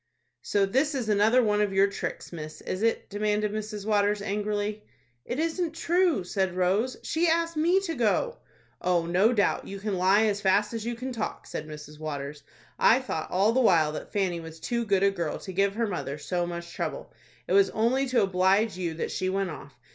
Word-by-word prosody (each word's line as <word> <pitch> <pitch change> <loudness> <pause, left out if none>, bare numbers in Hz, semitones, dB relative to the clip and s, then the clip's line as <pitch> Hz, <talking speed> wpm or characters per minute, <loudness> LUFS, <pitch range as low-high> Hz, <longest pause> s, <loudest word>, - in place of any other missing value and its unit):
"So 200 -1 +1
this 270 +9 +1
is 245 -5 -2
another 215 +5 +4
one 210 -1 +2
of 205 -2 0
your 195 +1 +5
tricks, 200 -2 -5
miss, 155 -2 -7
is 185 - -4
it?" 230 0 +1
demanded 210 0 0
Mrs. 215 -1 -5
Waters, 205 -1 +2
angrily. 210 +1 -2 0.4
"It 245 - -3
isn't 330 +1 -1
true," 345 - +2
said 190 0 -1
Rose. 195 +8 +1
"She 335 +2 +1
asked 335 0 +1
me 340 +5 +3
to 350 -4 -3
go." 270 - 0 0.4
"Oh, 175 -2 +1
no 185 +7 +3
doubt; 205 -5 +1
you 200 0 -6
can 200 -2 -2
lie 195 +4 +4
as 205 -1 0
fast 205 +3 +2
as 225 -2 -3
you 240 - -2
can 255 +3 -5
talk," 225 -3 -4
said - - -6
Mrs. 150 0 -10
Waters. 145 -1 -5 0.4
"I 235 - +6
thought 210 -12 -4
all 195 +4 +3
the 260 +3 +2
while 165 -9 +4
that 155 - -7
Fanny 185 -4 0
was 160 0 -10
too 235 +4 -2
good 195 -2 +2
a 200 - +4
girl 170 -5 -3
to 190 - -8
give 195 +2 +1
her 230 +1 +1
mother 145 -8 -4
so 175 +3 -2
much 170 0 -6
trouble. - - -5 0.3
It - - -1
was 400 0 +5
only 255 +5 +1
to 255 -4 +2
oblige 195 +3 +2
you 170 -3 -2
that 165 - -3
she 185 - -1
went 195 -1 -1
off. 140 -2 -11
205 Hz, 210 wpm, -27 LUFS, 180-235 Hz, 0.4 s, I